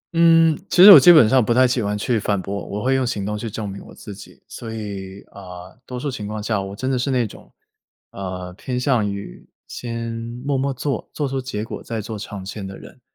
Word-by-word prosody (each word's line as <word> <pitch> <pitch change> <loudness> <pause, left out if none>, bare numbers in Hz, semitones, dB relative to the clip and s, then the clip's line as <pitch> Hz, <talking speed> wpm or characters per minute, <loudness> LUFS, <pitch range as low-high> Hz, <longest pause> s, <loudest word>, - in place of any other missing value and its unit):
嗯， 165 -1 +5
其 180 - +5
实 205 - +12
我 - - +12
基 175 - +8
本 155 -9 +7
上 130 +1 +4
不 115 - 0
太 130 +1 +5
喜 125 -1 0
欢 105 0 -2
去 115 +2 0
反 105 -1 -1
驳， 100 +2 -5
我 105 +1 -5
会 130 +1 +2
用 130 -1 +1
行 105 -5 -3
动 105 +1 -3
去 110 +2 -5
证 105 0 -5
明 100 0 -8
我 - - -14
自 105 - -10
己。 100 - -14
所 115 - -8
以， 100 -3 -7
呃， 90 -2 -11
多 125 -1 -6
数 145 +1 -3
情 105 -5 -6
况 105 0 -5
下 105 -2 -1
我 95 0 -7
真 130 +5 -3
的 130 - 0
是 130 - -1
那 125 -3 +1
种， 105 - -12 0.6
呃， 90 -2 -6
偏 125 +6 -4
向 125 -6 +1
于， 100 -11 -9 0.2
先 115 -1 -5 0.3
默 140 -1 0
默 135 +1 0
做， 135 -1 -4
做 145 - -1
出 135 0 -3
结 110 -5 -5
果 - - -7
再 115 -1 -5
做 110 0 -6
长 100 -1 -8
线 100 +1 -7
的 95 - -9
人。 - - -15
110 Hz, 260 characters per minute, -21 LUFS, 100-130 Hz, 0.6 s, 实